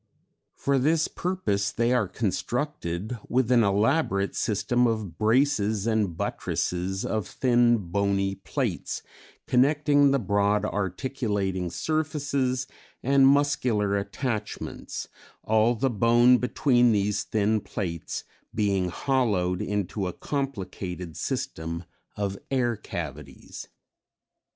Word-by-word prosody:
For 140 Hz, -1 st, +1 dB
this 160 Hz, +4 st, +2 dB
purpose 105 Hz, -, -1 dB
they 120 Hz, +1 st, +1 dB
are 120 Hz, -5 st, +2 dB
constructed 110 Hz, -, -3 dB
with 125 Hz, -1 st, +1 dB
an 120 Hz, -2 st, +6 dB
elaborate 100 Hz, 0 st, +1 dB
system 120 Hz, +4 st, +1 dB
of 110 Hz, -7 st, -3 dB
braces 110 Hz, -3 st, +2 dB
and 105 Hz, -7 st, 0 dB
buttresses 90 Hz, +2 st, -2 dB
of 110 Hz, -4 st, -2 dB
thin 120 Hz, -2 st, +3 dB
bony 100 Hz, +1 st, 0 dB
plates -, -, -3 dB, 0.4 s
connecting 145 Hz, +2 st, +4 dB
the 140 Hz, -, +3 dB
broad 100 Hz, -2 st, +1 dB
articulating 100 Hz, -2 st, -2 dB
surfaces 140 Hz, -, -1 dB, 0.4 s
and 135 Hz, +1 st, +5 dB
muscular 125 Hz, -8 st, +2 dB
attachments, 110 Hz, +3 st, -4 dB, 0.4 s
all 110 Hz, +2 st, +3 dB
the 130 Hz, +3 st, 0 dB
bone 120 Hz, +3 st, +5 dB
between 125 Hz, -2 st, +3 dB
these 100 Hz, 0 st, +1 dB
thin 110 Hz, 0 st, +1 dB
plates 85 Hz, -6 st, -4 dB, 0.3 s
being 100 Hz, -4 st, +1 dB
hollowed 100 Hz, -6 st, 0 dB
into 100 Hz, -1 st, -2 dB
a 90 Hz, -, -4 dB
complicated 95 Hz, -, -4 dB
system 85 Hz, -12 st, -3 dB, 0.3 s
of 100 Hz, -1 st, -3 dB
air 120 Hz, -3 st, +1 dB
cavities. 75 Hz, -9 st, -7 dB
110 Hz, 105 wpm, -26 LUFS, 100-130 Hz, 0.4 s, an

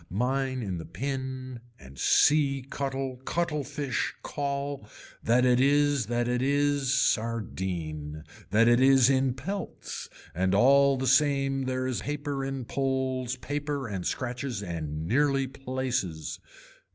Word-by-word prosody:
Mine 130 Hz, -, -1 dB
in 95 Hz, -4 st, -3 dB
the 80 Hz, -, -7 dB
pin 130 Hz, -2 st, -4 dB, 0.2 s
and 65 Hz, 0 st, -13 dB
see 140 Hz, -3 st, +4 dB
cuttle 135 Hz, -2 st, -3 dB
cuttle 150 Hz, +3 st, -2 dB
fish 140 Hz, -2 st, -2 dB
call 140 Hz, -4 st, -3 dB, 0.3 s
that 125 Hz, +2 st, +3 dB
it 125 Hz, -1 st, +4 dB
is 145 Hz, -3 st, +3 dB
that 120 Hz, +1 st, 0 dB
it 125 Hz, 0 st, 0 dB
is 140 Hz, 0 st, +1 dB
sardine, 90 Hz, -, -1 dB, 0.3 s
that 110 Hz, +4 st, +4 dB
it 120 Hz, 0 st, +5 dB
is 135 Hz, -1 st, +6 dB
in 130 Hz, -1 st, +2 dB
pelts 195 Hz, +7 st, -6 dB, 0.2 s
and 95 Hz, +2 st, +1 dB
all 140 Hz, +4 st, +5 dB
the 130 Hz, -, -2 dB
same 135 Hz, 0 st, +2 dB
there 130 Hz, 0 st, -1 dB
is 125 Hz, -6 st, -2 dB
paper 145 Hz, 0 st, -3 dB
in 135 Hz, -2 st, -4 dB
poles 130 Hz, -1 st, -1 dB
paper 145 Hz, 0 st, -3 dB
and 95 Hz, -4 st, -3 dB
scratches 125 Hz, -4 st, -3 dB
and 80 Hz, -4 st, -4 dB
nearly 135 Hz, -, +2 dB
places. 130 Hz, -, -3 dB
130 Hz, 130 wpm, -28 LUFS, 115-140 Hz, 0.3 s, is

